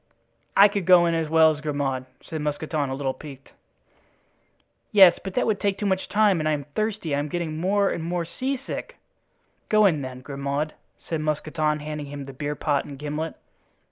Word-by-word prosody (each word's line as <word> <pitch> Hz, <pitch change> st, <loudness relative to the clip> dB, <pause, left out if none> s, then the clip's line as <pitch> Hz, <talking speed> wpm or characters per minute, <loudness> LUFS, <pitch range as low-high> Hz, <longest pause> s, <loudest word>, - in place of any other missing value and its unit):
"I 200 Hz, -, +9 dB
could 200 Hz, -3 st, -3 dB
go 180 Hz, -2 st, +7 dB
in 170 Hz, -, +1 dB
as 165 Hz, -2 st, -1 dB
well 160 Hz, 0 st, +6 dB
as 150 Hz, -1 st, -6 dB
Grimaud," 140 Hz, -4 st, -2 dB, 0.2 s
said 160 Hz, -1 st, -5 dB
Mousqueton, 150 Hz, -1 st, -2 dB
a 130 Hz, -, -2 dB
little 135 Hz, -1 st, -2 dB
piqued. 135 Hz, -2 st, -12 dB, 1.4 s
"Yes, 190 Hz, -5 st, +7 dB
but 190 Hz, -1 st, -6 dB
that 250 Hz, -, +2 dB
would 215 Hz, -3 st, 0 dB
take 200 Hz, -1 st, 0 dB
too 205 Hz, -, -3 dB
much 190 Hz, -1 st, 0 dB
time 205 Hz, -4 st, +3 dB
and 155 Hz, 0 st, 0 dB
I -, -, +2 dB
am 145 Hz, -1 st, -2 dB
thirsty. 215 Hz, -7 st, -2 dB
I -, -, 0 dB
am 145 Hz, -, -2 dB
getting 160 Hz, 0 st, -3 dB
more 195 Hz, +4 st, +2 dB
and 165 Hz, -, -3 dB
more 170 Hz, 0 st, -2 dB
seasick." 270 Hz, -, -4 dB, 0.7 s
"Go 215 Hz, -1 st, +5 dB
in, 160 Hz, -7 st, +3 dB
then, 130 Hz, -1 st, -7 dB
Grimaud," 140 Hz, +2 st, -3 dB, 0.3 s
said 160 Hz, -2 st, -2 dB
Mousqueton, 155 Hz, 0 st, -1 dB
handing 150 Hz, -1 st, -5 dB
him 140 Hz, -1 st, -7 dB
the 135 Hz, -, -9 dB
beer 145 Hz, +2 st, -3 dB
pot 145 Hz, -2 st, 0 dB
and 140 Hz, -, -9 dB
gimlet. 150 Hz, +2 st, -4 dB
155 Hz, 195 wpm, -25 LUFS, 145-190 Hz, 1.4 s, I